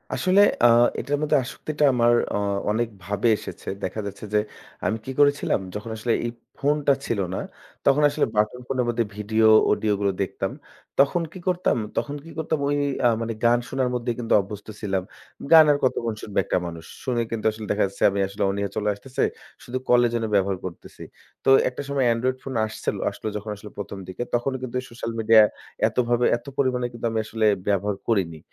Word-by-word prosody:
আসলে 185 +2 +4 0.2
আ - - +10 0.3
এটার 145 +1 -1
মধ্যে 155 0 +2
আসক্তিটা 150 +4 -4
আমার 120 -1 +4 0.2
আ - - +1 0.3
অনেক 115 +2 0 0.2
ভাবে 100 +5 -1
এসেছে। - - -10 0.2
দেখা 95 +4 -3
যাচ্ছে 100 +1 -7
যে 105 - +5 0.5
আমি 110 - +1
কি 130 - -4
করেছিলাম, 145 -5 +3 0.2
যখন 105 +2 -5
আসলে 115 +2 -1
এই 120 - -2 0.3
ফোনটা 145 0 +2
ছিল 115 - -1 0.2
না - - -2 0.5
তখন 140 +1 +4
আসলে - - +1
বাটন 105 +4 +1
ফোনের 125 -2 0
মধ্যে 120 0 +1
ভিডিও 110 +1 +2 0.2
অডিওগুলো 100 -2 +1
দেখতাম। 95 - -2 0.5
তখন 140 +5 +4
কি 185 - -8
করতাম? 180 -6 +1 0.2
তখন 145 - -1
কি 165 - -12
করতাম, 160 -1 -1
ওই 145 - +1 0.3
আ - - +8
মানে 115 0 -2
গান 120 +1 +5
শোনার 130 -1 0
মধ্যে 120 0 -1
কিন্তু 115 -2 0
অভ্যস্ত 100 +1 -9
ছিলাম। 95 -3 -1 0.5
গান 160 -1 +10
আর 145 - +3
কতক্ষণ 115 -3 0
শুনবে 105 - -2
একটা - - +1
মানুষ? 85 -1 -8 0.2
শুনে 125 -3 0
কিন্তু 115 -2 -4
আসলে 110 0 -8
দেখা 105 - +2
যাচ্ছে 100 - -6
আমি 100 - -2
আসলে 100 +2 -8
অনিহা 100 0 -2
চলে 105 0 0
আসতেছে। 125 +6 -3 0.4
শুধু 125 +1 -4
কলের 120 -1 +5
জন্য 115 -1 0
ব্যবহার 95 -1 +2
করতেছি। 90 -3 -9 0.4
তো - - +4 0.2
একটা 125 - -7
সময় 140 -2 +1
Android 130 +3 -1
phone 130 -3 -4
আসছিল 110 - -3
আসলো - - -7
যখন 105 +1 -7
আসলে 105 +1 -11
১ম 100 -1 -6
দিকে 95 +6 -4
তখনও 130 +2 0
কিন্তু 125 -1 -6
এই 125 - -7
social 115 0 -5
media 110 0 +7 0.5
এতভাবে 120 0 +1
এত - - -19
পরিমাণে 125 -2 +1
কিন্তু 120 0 -6
আমি 110 - 0
আসলে 110 0 -1 0.2
ব্যবহার 100 0 +1
করিনি। 90 -8 0
115 Hz, 190 wpm, -24 LUFS, 105-130 Hz, 0.5 s, আ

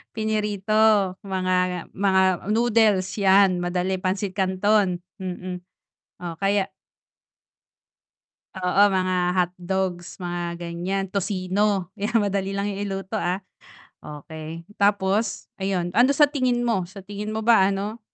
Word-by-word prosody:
Pinirito, 215 -2 -2 0.5
mga 185 -2 0
mga 190 -1 +2 0.3
noodles, 215 -3 +3
yan 190 -2 +5
madali, 180 +1 -1
pansit 190 +1 -1
canton, 190 -1 +1 0.2
mm, 185 -1 -5 0.6
o 175 -2 -5
kaya 195 0 +1 1.9
Oo, 185 +1 +1
mga 185 -2 0 0.2
hotdogs, 180 0 -2
mga 175 -1 -3
ganyan, 175 +3 -3
tocino, 195 -1 0
yan 215 +3 -2
madali 195 -1 -1
lang 200 +1 -1
yan 200 0 -5
iluto, 195 +2 -4
ah, 185 +2 -2 0.6
okey. 155 +2 -8 0.2
Tapos, 200 +1 +1
ayun, 190 -2 -1
ano 245 +8 +4
sa 295 - +7
tingin 250 -3 +1
mo, 195 -7 0
sa 190 +1 -11
tingin 205 +2 -6
mo 220 - -2
ba 220 -4 +5
ano, 200 +3 -3
190 Hz, 115 wpm, -24 LUFS, 180-205 Hz, 1.9 s, sa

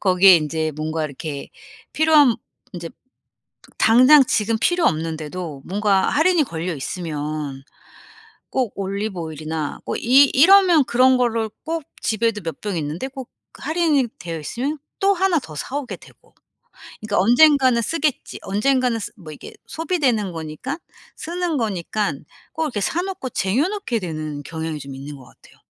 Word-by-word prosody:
거기에 185 -1 +6
이제 155 0 -1
뭔가 155 +1 -2
이렇게 145 0 -6 0.4
필요한 305 -6 +5 0.4
이제 170 -3 -7 0.9
당장 255 +6 +7
지금 220 -1 0
필요 350 +6 +2
없는데도 160 - -3
뭔가 200 0 +1
할인이 325 +1 +3
걸려 175 - -4
있으면 150 -2 -5 0.9
꼭 255 -5 -1
올리브 200 0 -3
오일이나 155 -1 -5
꼭 - - -2
이 265 +4 +6
이러면 355 +1 +6
그런 255 +2 +4
거를 230 -3 0 0.2
꼭 325 0 -3 0.2
집에도 220 -1 0
몇 165 -2 -6
병 205 -4 -3
있는데 155 - -3
꼭 265 -2 -9 0.2
할인이 310 -4 +1
되어 165 -2 -5
있으면 255 - -3 0.2
또 395 +1 +3
하나 375 -3 +2
더 160 - -11
사 250 - -5
오게 280 -4 -5
되고. - - -20 0.7
그러니까 215 -1 -1
'언젠가는 260 -1 +5
쓰겠지.' 300 +1 -2
언젠가는 245 +3 +1
쓰 220 - -6
뭐 165 -7 -11
이게 150 - -11
소비되는 270 - -1
거니까, 165 - -6 0.4
쓰는 345 -1 -3
거니깐 200 - -2 0.3
꼭 320 - -2
이렇게 250 -9 -3
사 340 - -1
놓고 370 -9 -5
쟁여 230 - 0
놓게 400 - -2
되는 155 -6 -5
경향이 160 +1 -5
좀 140 -1 -9
있는 140 +2 -8
것 130 - -14
같아요. - - -21
215 Hz, 310 characters per minute, -21 LUFS, -, 0.9 s, 당장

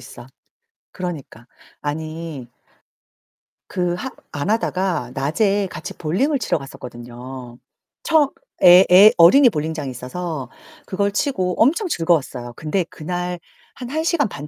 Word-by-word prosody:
있어. - - -12 0.7
그러니까 155 - -7 0.3
아니 155 -2 -5 1.2
그 180 -1 -1
하 260 +9 -5 0.2
안 145 +7 -3
하다가 185 - -1
낮에 195 +9 +1
같이 - - -7
볼링을 235 - 0
치러 220 - 0
갔었거든요. 125 -1 -10 0.5
처음 315 -4 +3 0.3
애 180 +1 +9
애 200 +4 +9
어린이 245 +10 +7
볼링장이 155 -4 -3
있어서 135 +2 -5 0.4
그걸 200 +1 -1
치고 190 - -1
엄청 335 - +3
즐거웠어요. 155 - -1
근데 160 +4 -1
그날 175 +2 -5 0.4
한 245 -2 -8
1 315 +4 -1
시간 325 -6 +1
반 150 -5 -8
175 Hz, 255 characters per minute, -21 LUFS, 145-205 Hz, 1.2 s, 애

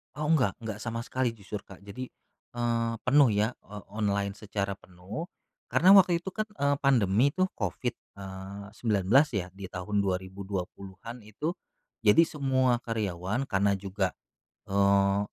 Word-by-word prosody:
Oh 150 0 -2
enggak 130 -11 +3
enggak 110 -2 -4
sama 115 0 -4
sekali 125 -2 -1
jujur, 100 0 -7
Kak. 100 0 -14
Jadi, 125 +6 -7 0.5
eee, 115 -1 0
penuh 135 -1 +5
ya 105 +4 +2
o 105 +1 -9 0.2
online 100 -1 +1
secara 100 -2 -3
penuh, 95 - -8 0.4
karena 160 +10 +5
waktu 180 -3 +7
itu 190 - -5
kan, 215 +2 -3
eee, 145 -9 0
pandemi 125 0 +3
tuh 185 0 +2
Covid, 120 -2 -2 0.2
eee, 95 +1 -8
19 115 +6 +3
ya, 90 -2 -2
di 95 0 -8
tahun 95 +3 -2
2020-an 95 +3 -4
itu. 150 +11 -3 0.5
Jadi 165 - +7
semua 130 -5 +1
karyawan 105 0 -2
karena 100 0 +2
juga, 95 -1 -2 0.5
eee, 100 0 +3
105 Hz, 140 wpm, -29 LUFS, 100-130 Hz, 0.5 s, waktu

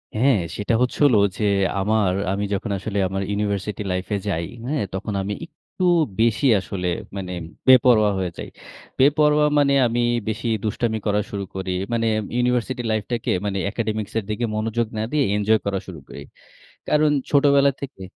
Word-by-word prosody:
হ্যাঁ, 125 +2 +3 0.2
সেটা 105 +3 -1
হচ্ছে 125 - 0
হলো 125 -6 +5 0.2
যে, - - -2 0.4
আমার 105 -1 +2 0.2
আমি 100 +1 -1
যখন 100 +2 -2
আসলে 100 +2 -4
আমার 95 +1 -3
ইউনিভার্সিটি 100 0 -2
লাইফ 90 0 -2
এ - - 0
যাই 85 -4 -1 0.2
হ্যাঁ? 145 -2 -1
তখন 100 +2 -4
আমি 100 +2 -3
একটু 185 - -9 0.4
বেশি 115 +4 +2
আসলে 90 0 -4 0.3
মানে 95 -2 -5 0.4
বেপরোয়া 120 -5 +6
হয়ে 90 -2 -2
যাই। - - -7 0.5
বেপরোয়া 150 +2 +4
মানে 140 -1 +3
আমি 120 +1 -1 0.3
বেশি 115 +2 -3 0.2
দুষ্টামি 110 +1 -1
করা 105 0 +2
শুরু 100 -1 -4
করি। 95 -1 -3 0.2
মানে 115 -1 +1 0.3
ইউনিভার্সিটি 125 0 0
লাইফ 110 -1 0
টাকে 120 -2 -1
মানে 100 -1 -2
একাডেমিকস 110 -2 -3
এর - - -6
দিকে 105 +3 -1
মনোযোগ 115 +2 -1
না - - -1
দিয়ে, 150 -2 +2
এনজয় 105 +1 +2
করা 100 -1 -1
শুরু 85 -5 -8
করি। - - -9 0.7
কারণ 150 0 +3 0.2
ছোটবেলা 140 -1 +4
থেকে 135 -8 -8
110 Hz, 165 wpm, -22 LUFS, 100-125 Hz, 0.7 s, বেপরোয়া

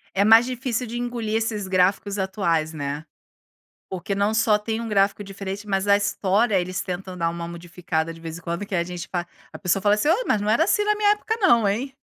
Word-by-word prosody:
É 200 - +3
mais 225 +3 +7
difícil 250 -1 -2
de 235 +1 -5
engolir 240 -3 -3
esses 220 -3 -1
gráficos 195 +2 +1
atuais, 170 -5 0
né. 145 +1 -4 0.8
Porque 190 +2 -4
não 200 +2 +1
só 220 -1 +3
tem 220 +2 -3
um 230 - -5
gráfico 200 0 +2
diferente, 195 +1 -6
mas 195 0 0
a 200 - +6
história 205 +1 +1
eles 185 +2 -3
tentam 185 0 -5
dar 165 -1 0
uma 170 0 -5
modificada, 170 -1 -4
de 165 - -13
vez 165 0 -7
em - - -12
quando, 170 +4 -4
que 195 - -4
a 170 - +1
gente 175 -1 -7
fa 175 -2 -3 0.3
a - - -7
pessoa 185 +1 +1
fala 205 +1 +4
assim: 255 +9 0
"Ô, 430 +9 +3
mas 210 - +2
não 210 - -1
era 265 +9 +4
assim 415 +1 +2
na 420 0 +2
minha 415 0 +3
época, 440 +2 -1
não, 235 - +4
hein!". 260 +7 -2
200 Hz, 230 wpm, -23 LUFS, 180-225 Hz, 0.8 s, mais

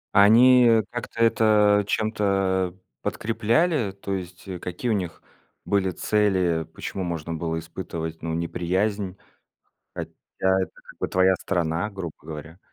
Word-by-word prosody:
А 100 - +8
они, 125 +4 +7
э, 115 -2 +5
как-то 120 -1 -6
это 105 -3 +4
чем-то, 95 -4 0
э, - - -25 0.2
подкрепляли? 115 - +1
То 100 0 -5
есть 90 0 -6
какие 90 +7 -4
у - - +3
них 90 -5 -3 0.4
были 95 -2 +1
цели, 95 -6 +1
почему 95 - -5
можно 85 -2 -4
было 80 0 -2
испытывать, 80 -1 -6
ну, 80 0 -3
неприязнь? 90 +4 -1 0.8
Хотя - - -5 0.3
это, 95 0 +2
как - - -17
бы, - - -1
твоя 95 0 +3
страна, 85 +2 -1
грубо 95 -6 -6
говоря. 80 +2 -9
95 Hz, 135 wpm, -25 LUFS, 85-105 Hz, 0.8 s, А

